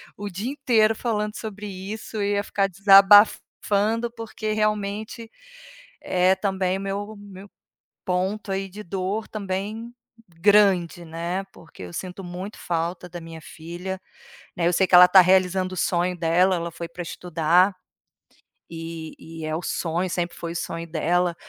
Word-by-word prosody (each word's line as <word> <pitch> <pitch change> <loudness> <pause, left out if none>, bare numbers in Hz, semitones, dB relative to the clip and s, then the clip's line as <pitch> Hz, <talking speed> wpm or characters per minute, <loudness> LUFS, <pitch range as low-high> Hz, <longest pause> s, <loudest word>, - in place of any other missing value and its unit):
o 205 0 -6
dia 200 +7 -4
inteiro 235 -6 +2
falando 210 -2 -2
sobre 210 -2 -7
isso 205 +3 -6
e 200 0 0
ia 200 0 0
ficar 195 -1 0
desabafando, 205 +3 +4
porque 220 -1 -4
realmente 215 +2 -2 0.7
é 185 +1 +2
também 190 -1 -1
meu 200 +2 -4
meu 200 -1 -12 0.6
ponto 190 +3 -2
aí 195 0 -2
de 205 +3 -9
dor, 195 +4 -3
também 210 +3 -5 0.4
grande, 180 -1 +3
né. 170 +4 -4
Porque 165 - -14
eu 90 - -9
sinto 185 +1 -6
muito 180 +4 -7
falta 170 +1 -3
da 175 0 -8
minha 165 -1 -10
filha, 175 +4 -7 0.6
né, 170 -1 +1
eu - - +3
sei 190 - +3
que - - -10
ela 180 0 +11
está 180 +1 +7
realizando 185 0 +2
o - - -7
sonho 180 +1 0
dela, 175 +3 +3
ela 170 0 -3
foi 170 +1 -7
pra 175 - -8
estudar, 175 +3 +1 1.0
e 165 -1 -7
e 160 -1 -8
é 155 0 -2
o 170 - -5
sonho 175 +2 -2
sempre 175 0 -2
foi 170 -1 -5
o - - -6
sonho 165 0 -4
dela 170 +2 +1
190 Hz, 155 wpm, -24 LUFS, 175-205 Hz, 1.0 s, ela